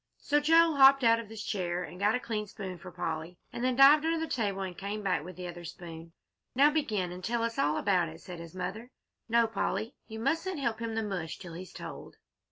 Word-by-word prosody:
So 295 +1 +1
Joel 325 +1 +5
hopped 275 0 +8
out 230 0 +5
of 225 -3 -8
his 220 -1 -7
chair 180 -3 -2
and 180 - -9
got 210 +3 +3
a - - 0
clean 215 -3 -3
spoon 190 -4 -7
for 185 - -9
Polly, 160 +2 -4 0.2
and 240 - -4
then 255 0 +2
dived 280 +3 +8
under 330 +1 +1
the 325 - -1
table 205 -9 -1
and 185 -2 -5
came 205 +3 -5
back 185 -5 0
with 180 +2 -9
the 180 +1 -7
other 175 0 -8
spoon. 165 -1 -9 0.4
"Now 285 +3 +6
begin 215 - -1
and 180 +1 -8
tell 230 +3 0
us 230 0 -2
all 150 +1 +2
about 180 -5 +2
it," 160 +1 -11
said 175 -1 -9
his 170 +1 -10
mother. 210 +6 -5 0.4
"No, 235 +1 +4
Polly, 225 +1 -2
you 220 - -7
needn't 330 +8 -1
help 235 -5 -1
him 230 -1 -3
the 225 - 0
mush 185 -6 -4
till 175 -3 -9
he's 180 +2 -8
told." - - -9
210 Hz, 235 wpm, -30 LUFS, 180-240 Hz, 0.4 s, hopped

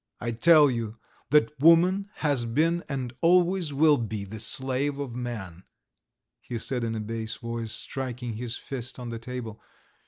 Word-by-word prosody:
"I 120 - -2
tell 150 +4 +6
you 115 -2 -4 0.3
that 150 -2 +4
woman 180 +6 +5 0.2
has 140 -5 +2
been 165 +9 +1
and 130 -3 -3
always 180 -1 +3
will 150 +1 +4
be 110 -3 -4
the 110 +3 -7
slave 130 +5 0
of 135 -5 -5
man," 110 -8 -5 0.8
he 120 - -6
said 125 +2 -2
in 115 -1 -2
a - - -3
bass 110 +1 -4
voice, 115 -1 -4
striking 125 -2 -3
his 120 +2 -5
fist 130 -2 -6
on 125 -2 -6
the 115 -1 -5
table. 115 -2 -7
125 Hz, 160 wpm, -27 LUFS, 115-145 Hz, 0.8 s, tell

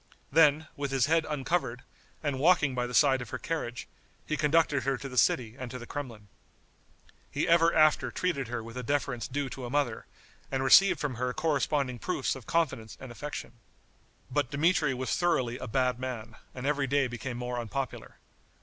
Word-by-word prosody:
Then, 155 -1 +5
with 140 -1 -3
his 135 -2 +2
head 160 +1 +2
uncovered, 140 -3 -1 0.4
and 140 -3 -1
walking 155 -3 +4
by 125 -1 -1
the 125 - -8
side 135 -2 +5
of 120 - -7
her 130 - -4
carriage, 125 -6 -4 0.4
he 155 - -1
conducted 150 -2 +2
her 135 0 0
to 135 - -7
the 130 - -9
city 115 -2 +2
and 130 -2 -6
to 125 - -6
the 120 - -9
Kremlin. 120 -7 -7 1.0
He 145 +5 -1
ever 165 0 +5
after 155 -2 +4
treated 150 -8 -1
her 120 -1 -4
with 115 +2 -9
the - - -2
deference 125 -3 -1
due 140 +1 -2
to 130 - -7
a 120 - -4
mother, 135 -4 -1 0.4
and 135 0 0
received 195 +9 +6
from 140 -5 -3
her 125 0 0
corresponding 140 -4 0
proofs 150 -4 -1
of 130 -4 -11
confidence 130 -10 -1
and 130 -2 -9
affection. 120 -2 -7 0.7
But 145 -1 0
Dmitri 150 -1 +2
was 130 +1 -1
thoroughly 130 -9 0
a - - -6
bad 125 +1 +1
man, 120 -4 -5 0.2
and 125 0 -6
every 140 -1 +1
day 140 +1 +2
became 120 0 -5
more 125 0 -3
unpopular. 125 +3 -5
135 Hz, 185 wpm, -29 LUFS, 125-150 Hz, 1.0 s, received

